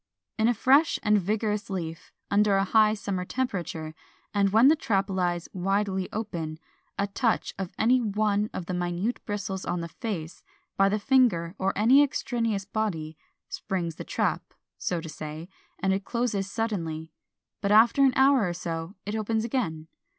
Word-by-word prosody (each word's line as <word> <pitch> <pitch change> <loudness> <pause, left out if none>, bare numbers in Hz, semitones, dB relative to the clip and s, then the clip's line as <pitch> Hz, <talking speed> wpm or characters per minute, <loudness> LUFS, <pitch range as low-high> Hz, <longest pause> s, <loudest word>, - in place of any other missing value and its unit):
In 220 - +4
a 240 - +3
fresh 275 +8 +4
and 210 -1 +4
vigorous 210 +2 -1
leaf, 165 -3 -5 0.2
under 205 0 +4
a 195 - +3
high 215 +2 +4
summer 200 -3 -3
temperature, 180 -9 -3 0.4
and 200 -1 +3
when 225 +6 +6
the 310 - +6
trap 195 -8 0
lies 175 -2 -1
widely 195 0 -1
open, 170 -8 -4 0.4
a 200 - +1
touch 220 +4 0
of 190 -2 -4
any 250 +3 +3
one 210 -1 0
of 180 - -5
the 185 - -4
minute 180 +6 -2
bristles 200 -2 -3
on 175 -1 -2
the 170 - -4
face, 170 -4 -5 0.3
by 195 0 +4
the 210 - +1
finger 210 -9 +2
or 195 0 +1
any 245 +7 +6
extraneous 230 -7 -1
body, 185 -7 -3 0.3
springs 175 -5 -3
the - - -5
trap - - -2 0.2
(so 175 -2 -1
to 165 - -8
say), 155 +1 -7 0.3
and 190 0 +1
it 195 +1 -2
closes 215 -4 -1
suddenly; 165 -8 -3 0.5
but 200 - 0
after 230 +6 +6
an 265 -2 +5
hour 265 -7 +4
or - - -2
so 170 +1 -5
it 205 +2 -3
opens 220 +1 -1
again. 165 -11 -2
200 Hz, 165 wpm, -27 LUFS, 175-220 Hz, 0.5 s, when